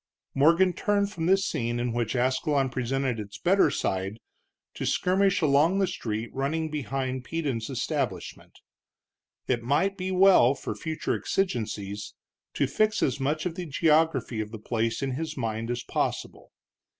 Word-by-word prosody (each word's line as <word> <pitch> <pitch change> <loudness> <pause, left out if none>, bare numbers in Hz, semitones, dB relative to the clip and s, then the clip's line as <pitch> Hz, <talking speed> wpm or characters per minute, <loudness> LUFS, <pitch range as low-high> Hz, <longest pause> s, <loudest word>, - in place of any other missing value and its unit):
Morgan 170 +6 +4
turned 200 +2 0
from 165 -5 -3
this 195 +1 +4
scene 120 - -2
in 120 -1 -1
which 120 +1 -1
Ascalon 130 +2 +1
presented 130 -1 -1
its 100 -1 -7
better 190 +3 +4
side, 95 +3 -2 0.6
to - - -5
skirmish 195 +1 +2
along 155 +5 +4
the 195 - +3
street 115 - -4
running 155 +4 -1
behind 130 -2 -3
Peden's 140 -7 -3
establishment. 130 - -4 0.9
It 120 -2 +1
might 160 +11 +1
be 185 0 -3
well, 185 -9 +6
for 140 - -5
future 160 -1 -3
exigencies, 105 - -2 0.4
to - - +2
fix 215 0 +1
as 130 +1 0
much 150 +4 -1
of 180 - -1
the 175 0 -6
geography 150 -6 +2
of 105 - -5
the 110 - -7
place 115 +2 -2
in 135 - -1
his 155 +5 -4
mind 115 -1 -3
as 120 0 -2
possible. - - -3
135 Hz, 150 wpm, -27 LUFS, 120-165 Hz, 0.9 s, well